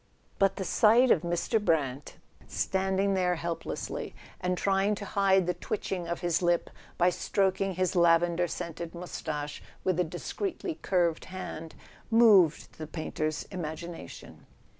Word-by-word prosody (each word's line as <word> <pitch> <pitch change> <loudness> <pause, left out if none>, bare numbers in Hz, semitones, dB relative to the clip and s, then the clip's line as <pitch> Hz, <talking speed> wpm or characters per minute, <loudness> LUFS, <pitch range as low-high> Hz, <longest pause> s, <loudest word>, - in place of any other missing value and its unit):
But 195 -1 +3
the 190 - -4
sight 230 +7 +5
of 165 - +4
Mr. 175 +5 0
Brant, 145 -6 -1 0.3
standing 190 +1 0
there 180 -2 +2
helplessly, 170 0 -4 0.2
and 180 0 -1
trying 195 +2 +2
to 205 - -7
hide 195 -2 +3
the 180 - 0
twitching 185 -3 -4
of 170 0 -3
his 175 -1 +1
lip 175 -1 +1 0.3
by 175 +1 +4
stroking 195 0 0
his 185 +1 0
lavender 170 0 +4
scented 170 -1 -6
moustache 155 -4 -5 0.2
with 185 -2 +1
a - - +4
discreetly 320 - -4
curved 175 -4 +1
hand, 175 -4 -7 0.3
moved 215 -12 +5
the 155 - -5
painter's 155 -1 -3
imagination. 170 -1 -7
180 Hz, 135 wpm, -29 LUFS, 170-195 Hz, 0.3 s, sight